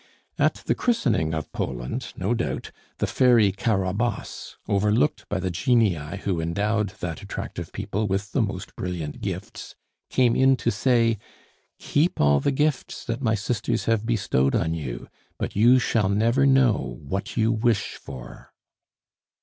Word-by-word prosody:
At - - +1
the - - +2
christening 125 - +1
of 80 -2 -5
Poland, 60 -1 -4
no 95 +6 0
doubt, 120 0 -3 0.3
the - - 0
Fairy 120 -6 +4
Carabosse, 100 +3 -2
overlooked 105 +8 +1
by 100 - -1
the 95 0 -2
genii 95 - +1
who 90 -4 0
endowed 105 +5 0
that 80 -4 -4
attractive - - -6
people 105 +2 -2
with 100 +2 -2
the 135 - +1
most 100 -2 -4
brilliant 85 -5 -4
gifts, - - -6 0.3
came 125 -3 +3
in 135 0 +5
to - - 0
say: 115 0 +2 0.6
"Keep 155 +5 0
all 70 -1 +4
the 140 - +1
gifts 145 0 -1
that 115 +2 -3
my 115 -4 +2
sisters 105 +1 -1
have 115 -2 +1
bestowed 70 - +1
on 80 0 +1
you; 65 -7 -5 0.3
but - - -4
you 120 +5 +6
shall 115 -5 +1
never 115 +7 +3
know 125 - +3
what 95 +12 -4
you 110 0 +3
wish 115 -2 +1
for!" 60 -2 -10
105 Hz, 150 wpm, -25 LUFS, 90-120 Hz, 0.6 s, you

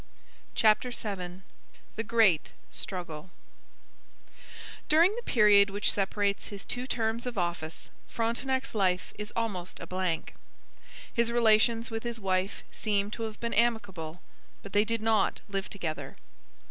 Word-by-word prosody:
CHAPTER 220 +3 +4
VII 190 -6 -5 0.5
THE 225 - -2
GREAT 220 -8 +3 0.2
STRUGGLE 180 -4 -5 1.6
During 335 +7 +5
the 480 - -4
period 210 - +5
which 205 +1 +1
separates 200 0 0
his 200 -1 -7
two 250 +1 -3
terms 230 0 -1
of 245 - -4
office 175 -3 -3 0.2
Frontenac's 260 +4 -1
life 185 -4 +1
is 210 0 -5
almost 200 -6 -3
a - - -6
blank. 185 -3 -2 0.8
His 235 -1 +2
relations 230 0 +4
with 225 0 -2
his 235 -1 -4
wife 190 0 -1
seem 205 -1 0
to 230 - -4
have 215 - -14
been 235 0 -2
amicable, 205 -8 0 0.4
but 200 - -10
they 205 +1 +4
did 230 0 -1
not 220 -2 +2
live 195 -1 -3
together. 160 -6 -5
210 Hz, 135 wpm, -29 LUFS, 190-230 Hz, 1.6 s, During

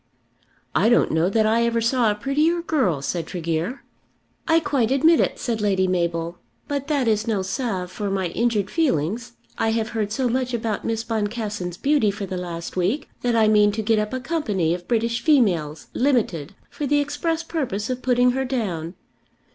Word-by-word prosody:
"I - - +3
don't 240 - +4
know 160 +3 +2
that 220 +2 +2
I 225 +2 +3
ever 235 0 +1
saw 230 0 +2
a 210 - 0
prettier 300 +9 +1
girl," 200 - 0
said 165 +2 -2
Tregear. 170 - -3 0.6
"I 325 0 +5
quite 270 -8 0
admit 315 +5 +4
it," - - +1
said 230 -4 -2
Lady 190 -2 +2
Mabel. 170 -1 -1 0.3
"But 285 -1 -3
that 285 -5 +1
is 220 0 +1
no 210 -4 0
salve 190 -3 -3
for 205 0 -3
my 190 -2 -1
injured 215 -1 0
feelings 235 - 0 0.3
I 225 - +2
have 225 0 -1
heard 220 -3 -2
so 260 +2 0
much 250 0 -1
about 225 -2 -2
Miss 225 0 -1
Boncassen's 210 -5 -3
beauty 280 -6 +2
for 200 0 -4
the 185 - -5
last 170 -2 -5
week, 185 - 0
that 240 -1 +1
I 220 -1 +4
mean 210 -1 +5
to 220 +1 -2
get 220 0 +2
up 210 0 -2
a 260 - -2
company 220 - 0
of 175 0 -6
British 230 0 0
females, 180 - +2
limited, 205 - 0 0.2
for 295 - -3
the 290 +2 +3
express 325 +3 -1
purpose 260 - -3
of 255 0 -3
putting 250 0 +3
her 265 +1 -1
down. 195 -10 -3
225 Hz, 185 wpm, -23 LUFS, 190-255 Hz, 0.6 s, I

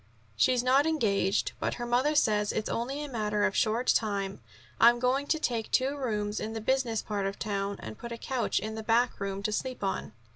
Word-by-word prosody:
"She's 250 - +3
not 270 +4 +4
engaged, 200 - +1
but - - -1
her 240 - -4
mother 255 +6 +2
says 210 -7 +2
it's 215 - -2
only 270 +5 -2
a - - -5
matter 210 -5 -1
of 205 -1 +2
a - - -10
short 230 +3 +1
time. 200 -5 0 0.4
I'm 235 +1 +7
going 255 +3 +1
to 320 - +2
take 235 -7 -2
two 265 +2 +1
rooms 210 -6 -2
in 220 +1 -4
the 225 - -3
business 235 -1 0
part 200 -2 -2
of 195 - -5
town, 200 -2 -2
and 110 0 -8
put 235 - -7
a 235 - -4
couch 255 0 -1
in 220 0 -2
the 220 - -5
backroom 215 -4 0
to 215 - 0
sleep 255 +2 -3
on." 190 - -2
225 Hz, 215 wpm, -29 LUFS, 205-255 Hz, 0.4 s, I'm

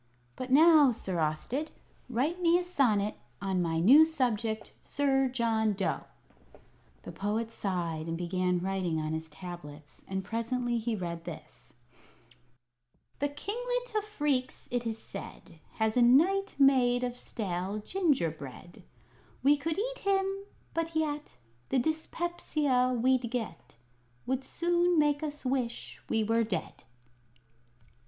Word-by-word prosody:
"But 255 - -5
now, 300 0 +7
Sir 190 -6 -3
Austed, 160 - -1 0.4
write 285 +9 0
me 340 0 +5
a 360 - -1
sonnet 225 - +1 0.2
on 190 -2 0
my 165 -1 0
new 260 - +8
subject, 235 -8 -1
Sir 270 -2 +1
John 225 -3 +1
Dough." 180 -8 -2 1.0
The - - -7
Poet 220 +3 -2
sighed 170 -7 -3
and 165 0 -2
began 180 +1 0
writing 180 -3 -1
on 155 0 -2
his 160 0 -4
tablets; 155 -3 -10
and 190 0 -3
presently 235 +3 -1
he 225 0 -1
read 170 -4 -4
this: 155 -2 -10 1.4
"The 285 - +1
Kinglet - - -3
of 425 - +2
Phreex, 290 -11 -2
it 240 -1 -1
is 225 -1 -2
said, 185 -5 -10
Has 220 -1 0
a 250 - +4
Knight 345 +12 +4
made 255 -3 +4
of 245 -1 -2
stale 195 -4 -3
gingerbread; 175 - -2 0.6
We 285 +2 +6
could 310 +2 -2
eat - - -2
him, 390 -1 +2 0.5
but 330 0 -2
yet 300 - -2 0.3
The - - +2
dyspepsia 300 -3 0
we'd 255 0 +2
get 225 - -5 0.5
Would 265 +1 -1
soon 345 +4 +1
make 295 -1 +3
us 295 -2 -5
wish 255 -2 -2
we 220 -1 +2
were 225 +2 +2
dead." 215 -4 -4
245 Hz, 130 wpm, -30 LUFS, 190-295 Hz, 1.4 s, new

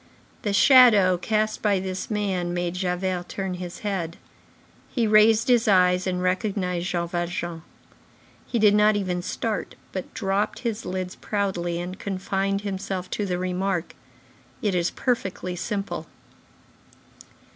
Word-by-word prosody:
The 205 - -1
shadow 215 -5 +7
cast 215 +4 -1
by 205 -3 +2
this 185 0 -4
man 190 -5 -1
made 175 -1 -1
Javert 180 0 -2
turn 190 -2 -3
his 180 0 -7
head. 175 -5 -2 0.7
He 235 -3 0
raised 215 +1 +5
his 245 -2 +4
eyes, 180 -2 +4
and 180 -1 -1
recognized 180 -1 -1
Jean 175 -2 -1
Valjean. 175 -1 -3 0.9
He 240 - -1
did 210 -2 +5
not 210 0 +5
even 185 -3 -1
start, 215 +4 -3 0.2
but 185 - -5
dropped 205 +2 -1
his 230 -3 -3
lids 185 0 -3
proudly 175 -4 -2
and 180 +2 -6
confined 195 0 -1
himself 190 -2 -4
to 205 - -2
the 180 -1 -1
remark: 185 -1 -2 0.7
"It 205 -3 +1
is 175 -1 +1
perfectly 190 -7 -2
simple." 200 +2 -4
190 Hz, 135 wpm, -25 LUFS, 180-210 Hz, 0.9 s, shadow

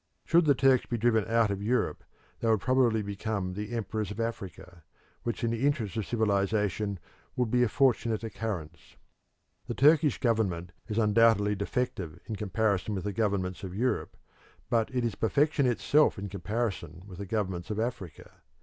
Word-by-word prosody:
Should 170 0 +4
the 145 -2 +5
Turks 135 -1 +3
be 120 - -2
driven 110 -2 +2
out 115 -2 +2
of 100 0 -3
Europe, 120 +4 0 0.4
they 115 - 0
would 110 -2 +4
probably 125 -4 +2
become 100 -2 -3
the 105 +3 -5
emperors 110 -3 -3
of 105 - -7
Africa, 95 -6 -5 0.4
which 120 0 -3
in 115 - +1
the 115 +2 -2
interests 140 - 0
of 110 -3 -2
civilisation 105 -2 0 0.4
would 125 -3 0
be 125 - +3
a 120 - +3
fortunate 115 -3 +2
occurrence. 95 -7 -6 0.7
The 120 - -3
Turkish 150 0 +4
government 95 -8 0 0.2
is 105 - -3
undoubtedly 105 -1 +4
defective 100 - -3
in 110 - -4
comparison 105 0 0
with 95 - -3
the 105 0 -3
governments 100 -3 -1
of 95 -1 -6
Europe, 125 +2 -1 0.5
but 115 -2 +2
it 125 -2 0
is 115 - -1
perfection 140 +6 +2
itself 145 +5 +3
in 100 0 -5
comparison 95 -3 -3
with 95 -3 -11
the 100 - -5
governments 95 -3 -2
of 105 0 -2
Africa. 110 -8 -5
110 Hz, 170 wpm, -29 LUFS, 100-120 Hz, 0.7 s, the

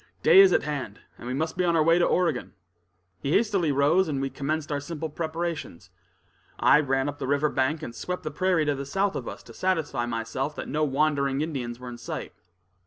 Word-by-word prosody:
"Day - - +8
is 390 -1 +8
at - - +3
hand, 140 -8 -5 0.2
and 120 - -8
we 125 - -2
must 160 +4 -2
be 180 - +2
on 170 -1 +2
our 160 - +4
way 165 +2 +4
to 175 - +4
Oregon." 165 - 0 0.7
He 140 +9 -1
hastily 200 -8 +2
rose, 150 +7 +3
and 145 -3 -2
we 135 0 -2
commenced 155 +2 -3
our 145 - 0
simple 160 +2 -5
preparations. 160 - -4 0.7
I - - +6
ran 135 -2 0
up 145 0 -5
the - - -3
river 145 +2 +2
bank, 145 +4 0
and 115 - -6
swept 180 +9 -5
the - - -4
prairie 185 -4 +1
to 145 - +1
the 140 0 -4
south 195 +6 0
of - - -4
us - - -7
to - - -13
satisfy 155 -10 -1
myself 120 +5 -3
that - - -6
no 155 +1 -1
wandering 140 -1 +1
Indians 125 -7 -4
were 125 - -9
in 120 -1 -9
sight. - - -6
150 Hz, 220 wpm, -26 LUFS, 135-165 Hz, 0.7 s, Day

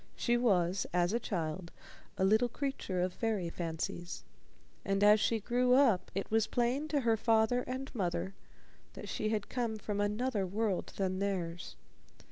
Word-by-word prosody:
She 240 - +1
was, 190 -6 +2
as 175 +2 +2
a 235 - +2
child, 170 -4 -3 0.5
a 190 - +2
little 220 +5 +4
creature 255 -9 -3
of 180 0 -1
fairy 210 -7 -1
fancies, 170 +1 -4 0.6
and 195 +1 +1
as 210 +1 +7
she 225 +2 +1
grew 250 +3 +2
up 230 -10 +4
it 195 - -3
was 225 -1 +3
plain 250 +5 0
to 295 -2 0
her 230 -2 +3
father 225 +2 +2
and 260 +1 -5
mother 190 -3 -2 0.6
that - - -8
she 215 - -2
had 215 -2 -1
come 235 -3 -2
from 205 -1 -3
another 210 0 0
world 205 0 -1
than 185 -1 -1
theirs. 180 -3 -3
210 Hz, 160 wpm, -33 LUFS, 185-240 Hz, 0.6 s, as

